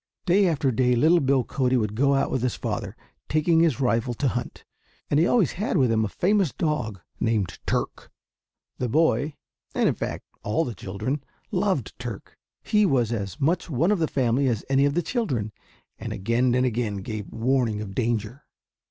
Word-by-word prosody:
Day 190 +2 +4
after 145 -5 +1
day 125 +1 +2
little 160 +8 +5
Bill 135 -2 +2
Cody 130 +1 +1
would 105 -3 -1
go 140 +5 +3
out 135 - +1
with 130 - 0
his 125 -1 0
father, - - -4 0.3
taking 160 +2 +3
his 165 -8 +3
rifle, 120 -2 +1
to 140 +2 +1
hunt, 120 0 -5 0.5
and 145 - +4
he 170 - +4
always 220 - +3
had 200 0 -1
with 130 -5 +3
him 110 -1 +2
a - - 0
famous 190 - +1
dog 110 - -2 0.2
named 110 -5 0
"Turk." - - -2 0.7
The 125 - -1
boy, 145 0 +2 0.4
and - - +3
in - - +2
fact - - -5 0.2
all 110 +10 0
the 120 - -4
children, 110 +9 -4 0.3
loved 185 - 0
Turk. 120 -5 -7 0.3
He 210 0 +3
was 125 - +2
as 100 +2 -4
much 170 +6 +1
one 160 +7 +2
of 210 - +2
the 160 - +1
family 130 0 +1
as 115 -4 -1
any 135 +1 +4
of 145 +1 +1
the 175 - +1
children, 135 - -2 0.5
and - - -5
again 120 +5 +1
and 125 0 +3
again 115 -4 -1
gave 105 -1 -6
warning 115 -2 +1
of 105 -2 -6
danger. 115 +2 -2
130 Hz, 185 wpm, -25 LUFS, 115-155 Hz, 0.7 s, little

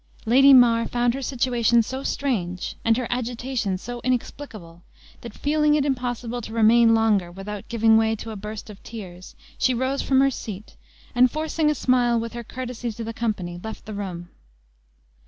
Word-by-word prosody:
Lady 270 +5 +6
Mar 235 -3 +6
found 240 0 +1
her 270 - -4
situation 240 -3 +2
so 260 +4 -5
strange, 190 -12 -2
and 225 0 +3
her 250 - -2
agitation 245 -4 -2
so 240 +5 -7
inexplicable, 220 -8 -4 0.4
that 235 - -8
feeling 300 0 +2
it 290 -2 +1
impossible 245 -3 -2
to 220 - -8
remain 225 +1 +5
longer 210 -6 +2
without 195 +2 -7
giving 225 -1 +4
way 225 0 +2
to 225 +1 -8
a - - -6
burst 210 +2 -7
of 200 - -14
tears, 185 -5 -10 0.2
she 255 - +2
rose 260 +3 -1
from 265 -1 +2
her 275 0 +4
seat, 215 -4 -8 0.4
and 250 0 +5
forcing 310 +2 0
a 300 - +1
smile 245 -3 +2
with 230 +1 -5
her 235 0 -6
courtesy 245 -1 -5
to 230 +2 -7
the 225 +1 -5
company, 190 -7 -3
left 220 0 -7
the 215 - -7
room. 180 -4 -6
235 Hz, 175 wpm, -24 LUFS, 215-255 Hz, 0.4 s, Lady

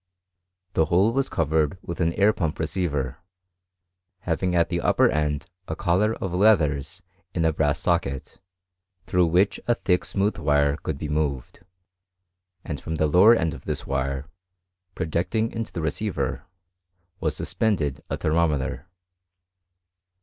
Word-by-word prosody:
The 80 - +3
^^ole 95 +7 +3
was 135 +1 0
covered 80 +1 +1
with 85 +1 -5
an 85 0 +2
air 100 +3 +4
pump 80 -6 -2
receiver, 75 -5 -2 1.0
having 90 +1 -1
^t 85 -1 +3
the 85 0 -2
upper - - +4
end 75 -1 0 0.2
a 80 - -3
collar 100 +8 +1
of 95 -3 -4
leathers 85 -4 +2 0.3
in 85 -2 +1
a 80 - +3
brass 75 -2 +1
socket, 70 +5 -1 0.6
through 90 -1 +2
which 90 +5 +2
a 120 - +3
thick 90 -5 +1
smooth 100 0 -1
wire 75 -2 +2
could 80 - -4
be 75 - -4
moved; 75 -4 -2 1.1
5^nd 75 -6 -4
from 80 - -4
the 80 - +1
lower 95 +10 +6
end 80 -7 0
of - - -11
this - - -3
wire, 70 0 -2 0.7
projecting 90 +6 -1
into 115 -1 -4
the 85 - -4
receiver, 80 -4 -2 0.7
was - - -1
suspended 80 -12 -1
a - - -2
thermometer. 75 -3 0
80 Hz, 140 wpm, -25 LUFS, 75-95 Hz, 1.1 s, lower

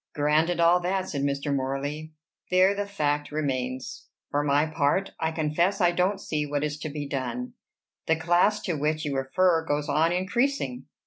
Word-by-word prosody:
"Granted 155 +4 +2
all 170 +1 +5
that," 185 +1 -1
said 140 - -3
Mr. 140 +1 -1
Morley, 140 +4 -3 0.4
"there 185 +2 +4
the 200 0 -3
fact 145 -7 -1
remains. 130 -4 -3 0.2
For 145 - +1
my 145 +1 +3
part, 155 +4 0
I 160 0 0
confess 170 +5 0
I 175 -2 +4
don't 185 +3 +1
see 155 -5 -2
what 145 0 -2
is 150 0 -3
to 155 - -4
be 145 -1 -5
done. 125 -3 -4 0.5
The 160 - +4
class 175 +6 +2
to 180 - -2
which 155 +1 -1
you 145 -2 -2
refer 160 +6 +2
goes 145 -2 -1
on 160 +2 +3
increasing. 185 - -1
155 Hz, 175 wpm, -26 LUFS, 145-175 Hz, 0.5 s, all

